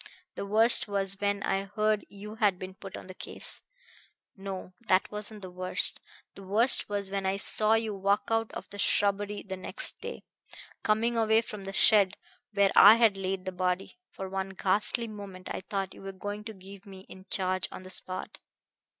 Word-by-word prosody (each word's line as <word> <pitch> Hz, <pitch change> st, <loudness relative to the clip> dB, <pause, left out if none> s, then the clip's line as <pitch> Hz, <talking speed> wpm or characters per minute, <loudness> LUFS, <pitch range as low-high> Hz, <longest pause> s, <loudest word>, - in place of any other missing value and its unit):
The 200 Hz, -, -6 dB
worst 220 Hz, +4 st, +6 dB
was 195 Hz, -1 st, 0 dB
when 200 Hz, 0 st, 0 dB
I 195 Hz, +1 st, -1 dB
heard 215 Hz, +1 st, 0 dB
you 205 Hz, +1 st, -10 dB
had 205 Hz, -4 st, +2 dB
been 185 Hz, +1 st, -8 dB
put 190 Hz, 0 st, -10 dB
on -, -, -10 dB
the 185 Hz, -, -10 dB
case -, -, -2 dB, 0.7 s
no, 195 Hz, -2 st, -7 dB
that 185 Hz, -1 st, +2 dB
wasn't 210 Hz, 0 st, -5 dB
the 185 Hz, -, -8 dB
worst. 185 Hz, 0 st, -1 dB, 0.3 s
The -, -, -12 dB
worst 210 Hz, +7 st, +5 dB
was 200 Hz, -1 st, -3 dB
when 195 Hz, -1 st, -2 dB
I 190 Hz, +1 st, 0 dB
saw 215 Hz, +2 st, +3 dB
you 225 Hz, -1 st, -1 dB
walk 200 Hz, +1 st, 0 dB
out 225 Hz, 0 st, 0 dB
of -, -, -7 dB
the 205 Hz, -, -8 dB
shrubbery 205 Hz, +1 st, 0 dB
the 190 Hz, -1 st, -6 dB
next 185 Hz, -, +1 dB
day, -, -, -7 dB, 0.6 s
coming 225 Hz, +3 st, +1 dB
away 220 Hz, 0 st, +3 dB
from 210 Hz, -3 st, -9 dB
the 195 Hz, -, -5 dB
shed 205 Hz, -1 st, +4 dB, 0.3 s
where 200 Hz, -2 st, +3 dB
I 205 Hz, +3 st, +10 dB
had 230 Hz, -3 st, +4 dB
laid 190 Hz, -1 st, -4 dB
the 185 Hz, -, -3 dB
body. 185 Hz, -, -3 dB
For 190 Hz, -, -7 dB
one 190 Hz, 0 st, -4 dB
ghastly 210 Hz, +4 st, +1 dB
moment 200 Hz, -4 st, -9 dB
I -, -, -5 dB
thought 195 Hz, -2 st, -3 dB
you -, -, -14 dB
were 195 Hz, 0 st, -6 dB
going 205 Hz, +2 st, -6 dB
to 220 Hz, -, -7 dB
give 195 Hz, +1 st, -14 dB
me 190 Hz, -1 st, -11 dB
in 190 Hz, 0 st, -14 dB
charge 185 Hz, -1 st, 0 dB
on -, -, -9 dB
the 185 Hz, -, -10 dB
spot. 185 Hz, 0 st, -4 dB
200 Hz, 195 wpm, -28 LUFS, 190-210 Hz, 0.7 s, I